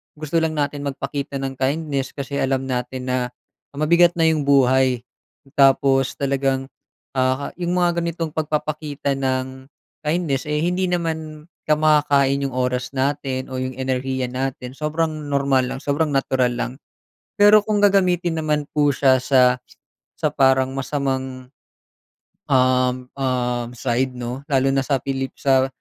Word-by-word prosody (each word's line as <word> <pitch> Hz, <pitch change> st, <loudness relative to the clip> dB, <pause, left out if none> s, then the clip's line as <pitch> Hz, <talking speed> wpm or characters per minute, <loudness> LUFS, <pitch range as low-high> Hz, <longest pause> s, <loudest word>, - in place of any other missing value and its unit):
gusto 155 Hz, +2 st, -1 dB
lang 160 Hz, -1 st, -1 dB
natin 145 Hz, -1 st, -2 dB
magpakita 140 Hz, +1 st, -4 dB
ng 135 Hz, -1 st, -5 dB
kindness, 140 Hz, 0 st, -1 dB
kasi 140 Hz, 0 st, -4 dB
alam 135 Hz, 0 st, 0 dB
natin 125 Hz, 0 st, -3 dB
na 125 Hz, -, +1 dB, 0.6 s
mabigat 170 Hz, +4 st, +4 dB
na 165 Hz, -, +1 dB
'yong 155 Hz, -3 st, +1 dB
buhay. 130 Hz, -2 st, +3 dB, 0.5 s
Tapos 135 Hz, -1 st, +4 dB
talagang 135 Hz, -1 st, 0 dB, 0.5 s
ah, 130 Hz, +2 st, +1 dB
'yong 175 Hz, -1 st, -2 dB
mga 175 Hz, -1 st, +1 dB
ganitong 170 Hz, -1 st, -3 dB
pagpapakita 150 Hz, -2 st, -2 dB
ng 130 Hz, 0 st, -2 dB, 0.4 s
kindness 150 Hz, -4 st, 0 dB
eh, 150 Hz, 0 st, -1 dB
hindi 180 Hz, +3 st, 0 dB
naman 160 Hz, -3 st, -3 dB, 0.2 s
ka 155 Hz, -, +3 dB
makakain 145 Hz, -3 st, +3 dB
'yong 135 Hz, -, -4 dB
oras 125 Hz, 0 st, -1 dB
natin 135 Hz, -1 st, -2 dB
o 130 Hz, -, -5 dB
'yong 130 Hz, 0 st, -3 dB
enerhiya 130 Hz, 0 st, -2 dB
natin 130 Hz, 0 st, -4 dB
sobrang 155 Hz, 0 st, -2 dB
normal 140 Hz, -2 st, +2 dB
lang 130 Hz, -, -5 dB
sobrang 145 Hz, +2 st, 0 dB
natural 130 Hz, -2 st, +1 dB
lang. 120 Hz, 0 st, -3 dB, 0.7 s
Pero 205 Hz, +1 st, +7 dB
kung 210 Hz, 0 st, 0 dB
gagamitin 180 Hz, -4 st, +2 dB
naman 150 Hz, -2 st, -1 dB
po 145 Hz, -1 st, +3 dB
siya 130 Hz, -1 st, +3 dB
sa, 125 Hz, -1 st, +4 dB, 0.6 s
sa 155 Hz, -, +1 dB
parang 130 Hz, -1 st, +3 dB
masamang 130 Hz, -1 st, -3 dB, 1.0 s
Uhm, 130 Hz, -2 st, +2 dB
uhm, 125 Hz, -2 st, -1 dB
side 125 Hz, +1 st, -1 dB
'no 125 Hz, +1 st, -5 dB
lalo 135 Hz, -3 st, +2 dB
na 135 Hz, -, +1 dB
sa 140 Hz, -2 st, +1 dB
Pilip 135 Hz, -1 st, -3 dB
sa, 135 Hz, -1 st, +2 dB
135 Hz, 140 wpm, -21 LUFS, 130-155 Hz, 1.0 s, Pero